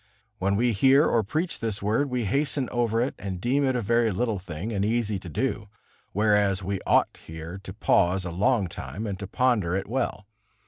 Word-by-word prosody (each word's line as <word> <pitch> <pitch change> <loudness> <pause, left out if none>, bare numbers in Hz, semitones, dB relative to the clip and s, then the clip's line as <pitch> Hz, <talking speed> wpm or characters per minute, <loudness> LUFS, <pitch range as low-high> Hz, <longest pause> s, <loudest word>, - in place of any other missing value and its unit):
When 100 +1 +1
we 120 +3 +2
hear 135 +8 +5
or 115 - +3
preach 155 - -2
this 110 -3 -2
word, 110 +8 0
we 125 -3 -1
hasten 140 +4 0
over 115 -2 +1
it 130 - -1
and 95 -2 -5
deem 130 +8 +1
it 130 -2 +1
a 120 - -1
very 115 +2 +2
little 110 +1 -1
thing 90 +4 -6
and 100 -1 0
easy 110 -2 0
to 90 - -9
do, 105 - -2 0.4
whereas 105 -2 +2
we 95 0 -2
ought - - +2
here 80 +3 -7
to 95 - -8
pause 95 -2 +2
a 85 - -4
long 100 +4 +2
time 95 +4 -6
and 100 -3 -4
to 100 - -5
ponder 105 -7 +1
it 95 - -2
well. 120 -3 -2
105 Hz, 200 wpm, -26 LUFS, 95-120 Hz, 0.4 s, hear